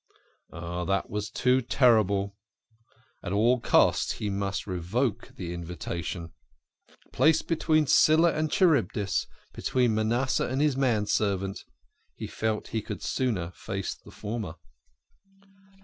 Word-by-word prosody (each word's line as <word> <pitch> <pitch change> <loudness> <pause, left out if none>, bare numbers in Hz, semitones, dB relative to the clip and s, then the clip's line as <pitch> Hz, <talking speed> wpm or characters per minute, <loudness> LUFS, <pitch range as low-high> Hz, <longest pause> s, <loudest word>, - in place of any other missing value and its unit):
Oh, 85 +1 -5
it 95 - -1
was 105 0 -3
too 130 +1 +2
terrible. 105 -6 +2 0.9
At 90 - -4
all 120 +5 +3
costs - - +3
he 105 -2 -3
must 100 0 -2
revoke 105 +6 -2
the 85 -2 -5
invitation 85 -1 -5 0.2
( - - -58
?). - - -28
Placed 160 0 +3
between 155 -2 +2
Scylla 160 +4 +5
and 155 0 -1
Charybdis, 145 - +2 0.3
between 125 -3 +1
Manasseh 115 +4 +1
and 130 +2 -2
his 150 -2 +2
manservant, 105 -6 0 0.6
he - - -6
felt 110 -1 -3
he 110 - -2
could 105 0 -7
sooner 105 -10 -1
face 95 +1 -4
the - - -17
former. 105 -6 -5
110 Hz, 125 wpm, -27 LUFS, 95-130 Hz, 0.9 s, Scylla